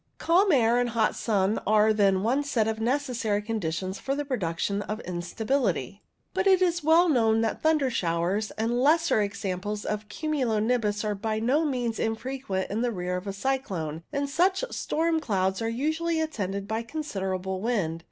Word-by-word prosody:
Calm 370 +4 +3
air 240 -4 +4
and 245 0 +1
hot 225 -1 +1
sun 205 -2 +1
are 215 +1 +4
then 195 -2 +3
one 255 +6 +2
set 235 -6 0
of 220 0 -2
necessary 235 -4 0
conditions 190 -4 -3
for 275 - -2
the 290 0 -3
production 200 - -1
of 215 +2 -4
instability. 185 - -2 0.3
But 375 +1 +1
it 380 -1 +6
is 345 -3 +1
well 325 +3 +5
known 225 -7 +3
that 225 - -1
thunder 305 -4 +2
showers 180 +1 0
and 235 +3 0
lesser 320 -3 +3
examples 205 0 -3
of 210 0 -3
cumulo 280 -8 -1
nimbus 215 -2 0
are 210 - 0
by 215 +2 -2
no 260 +8 +2
means 245 -5 -1
infrequent 225 -4 -2
in 215 +3 -1
the 245 -1 +1
rear 180 -3 -3
of 180 +2 -5
a - - -1
cyclone, 195 - -2
and 280 0 -1
such 370 - +2
storm 325 0 0
clouds 190 -7 0
are 225 - 0
usually 315 +7 -1
attended 200 -11 -3
by 220 +1 -1
considerable 190 -9 -3
wind. 195 -8 -1
225 Hz, 170 wpm, -27 LUFS, 200-275 Hz, 0.3 s, it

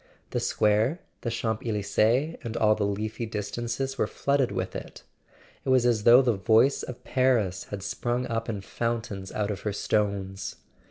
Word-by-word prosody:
The - - 0
square, 110 +9 +2 0.2
the 120 - -2
Champs 110 -1 -2
Elysees 115 +7 +1
and 115 -1 -4
all 110 -1 +4
the 105 -1 0
leafy 110 +3 -3
distances 120 +5 -3
were - - +2
flooded 140 -4 +1
with 95 -1 -3
it: - - -8 0.6
it - - -3
was 130 -2 +4
as 115 -4 +2
though 120 +3 +8
the 120 -2 +3
voice 110 +7 +3
of 125 0 -8
Paris 115 -7 +1
had 100 -2 -6
sprung 120 +4 -1
up 115 -1 -3
in 105 -3 -3
fountains 110 -2 -3
out 105 0 -1
of 100 - -4
her 105 - -3
stones. 100 -1 -1
110 Hz, 170 wpm, -27 LUFS, 105-120 Hz, 0.6 s, though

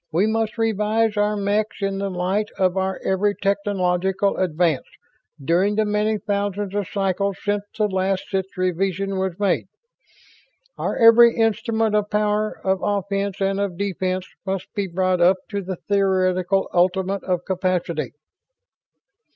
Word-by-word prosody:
We 175 +6 +2
must 220 0 -1
revise 220 0 +1
our 210 0 +1
mechs 205 +2 0
in 195 0 -1
the 200 0 -2
light 190 +3 -1
of 185 -1 +2
our 190 0 -1
every 200 +2 +1
technological 195 -1 0
advance 170 -5 0 0.5
during 175 +8 +1
the 215 0 +2
many 210 +1 +1
thousands 200 0 -2
of 205 -3 -1
cycles 195 0 -1
since 205 0 -1
the 215 -1 +2
last 190 -1 -1
such 190 -1 0
revision 190 +2 -1
was 190 -2 -2
made. 205 -1 0 1.1
Our - - -2
every 230 0 +7
instrument 225 0 +1
of 210 -1 +1
power, 210 0 0
of 190 0 +1
offense 200 -1 -1
and 195 0 +1
of 200 -4 -2
defense, 185 -1 -2 0.2
must 190 -1 -4
be 200 -1 -2
brought 185 0 0
up 180 +2 +5
to 200 -1 -2
the 185 0 -4
theoretical 190 -1 +1
ultimate 185 +2 +1
of 180 -2 -1
capability." 185 -4 -1
195 Hz, 145 wpm, -22 LUFS, 185-205 Hz, 1.1 s, every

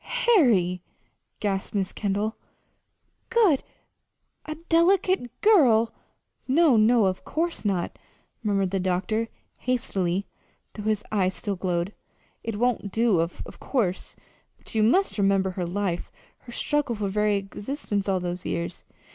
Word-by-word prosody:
"Harry!" 220 - +4 0.6
gasped 195 -1 -2
Mrs. 195 -2 -1
Kendall. 205 +2 -1 0.9
"'Good' 410 - +4 0.8
a 310 - -4
delicate 345 -4 +3
girl!" 245 - +5 0.5
"No, 295 0 +5
no, 220 0 +5
of 185 -1 -1
course 335 +2 -2
not," 195 -5 -1 0.4
murmured 195 -4 0
the 195 - 0
doctor, 185 +5 0 0.3
hastily, 200 -7 -1 0.5
though 210 - -7
his 215 0 0
eyes 190 -3 +1
still 205 -3 -3
glowed. 180 +1 -1 0.5
"It 225 -2 -3
won't 235 -4 0
do, 225 -5 +3
of 165 +1 -2 0.2
course; 200 -9 -1 0.4
but - - -13
you 220 - +2
must 245 - +3
remember 195 -1 +2
her 180 -1 -3
life, 180 -1 -2 0.4
her - - -8
struggle 290 -1 0
for 205 -1 -2
very 210 +1 +1
existence 200 +1 -3
all 190 -1 +2
those 180 0 -4
years. 170 +1 -4
210 Hz, 130 wpm, -26 LUFS, 190-245 Hz, 0.9 s, girl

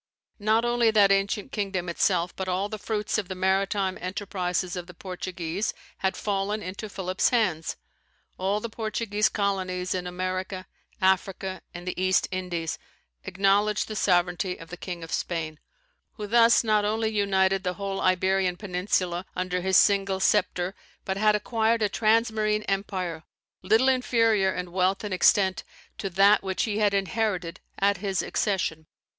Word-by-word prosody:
Not 220 +3 +2
only 240 -1 +3
that 205 -2 +5
ancient 200 +5 0
kingdom 195 -5 -2
itself, 170 0 +1
but 190 - -4
all 185 +2 -1
the 215 -1 -6
fruits 210 0 -1
of 200 - -4
the 190 - -5
maritime 190 +1 0
enterprises 185 -1 -2
of 175 -1 -6
the 180 - -12
Portuguese 180 +1 -4 0.2
had 190 0 0
fallen 205 +1 -1
into 195 +4 -6
Philip's 185 -1 0
hands. 185 -10 0 0.6
All 195 +3 0
the 235 - -4
Portuguese 215 -1 -1
colonies 185 -3 -1
in 180 -1 -3
America, 185 +1 -3 0.4
Africa, 190 0 0
and 175 0 -9
the 180 - -3
East 185 0 +3
Indies, 175 -3 -3 0.5
acknowledged 200 +2 +2
the 215 - -6
sovereignty 180 -1 +1
of 165 - -12
the - - -5
King 175 -1 -6
of 165 - -9
Spain; 160 -3 -3 0.5
who 210 - -6
thus 230 +2 +5
not 215 -2 +2
only 220 +1 0
united 195 -2 +2
the 180 -1 -2
whole 195 -1 -3
Iberian 185 0 +2
peninsula 180 -2 -1
under 180 0 -1
his 190 +1 +3
single 195 -2 +3
sceptre, 185 -2 +1 0.3
but 190 0 -2
had 210 +1 +4
acquired 225 +1 +1
a 210 - +2
transmarine 215 0 +1
empire, 185 -4 -2 0.4
little 220 +7 +3
inferior 230 -6 +3
in 180 -1 -5
wealth 185 +2 +1
and 205 -2 -3
extent 190 +1 +3 0.4
to 195 - -2
that 195 +3 +5
which 190 -1 -1
he 215 -2 -1
had 205 -2 +3
inherited 195 -3 -1 0.2
at 200 0 +2
his 190 -1 -1
accession. 185 -6 -1
195 Hz, 155 wpm, -26 LUFS, 185-210 Hz, 0.6 s, that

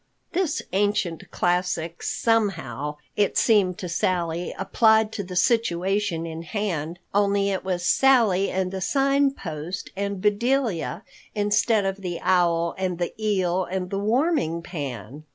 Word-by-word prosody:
This 355 -3 -1
ancient 200 -4 0
classic 175 -2 -1
somehow, 165 - -1 0.2
it 205 -1 +1
seemed 195 -6 +3
to 180 - -5
Sally, 175 0 -1
applied 220 -1 +3
to 210 -2 -4
the 180 0 -8
situation 195 -5 +1
in 165 0 -6
hand, 170 -3 -3 0.2
only 200 0 +2
it 190 - -2
was 180 -2 -2
Sally 225 -8 +4
and 185 -1 -1
the 190 -1 -4
Sign 275 +5 +2
Post 175 - -6
and 200 0 -3
Bedelia 215 - 0 0.3
instead 205 0 +2
of 195 0 -1
the 180 -3 -5
owl 170 -2 +2
and 185 -2 -1
the 175 0 -2
eel 185 -3 +1
and 185 0 -4
the 195 - -1
warming 225 - +1
pan. 145 - -6
190 Hz, 135 wpm, -24 LUFS, 170-210 Hz, 0.3 s, Sally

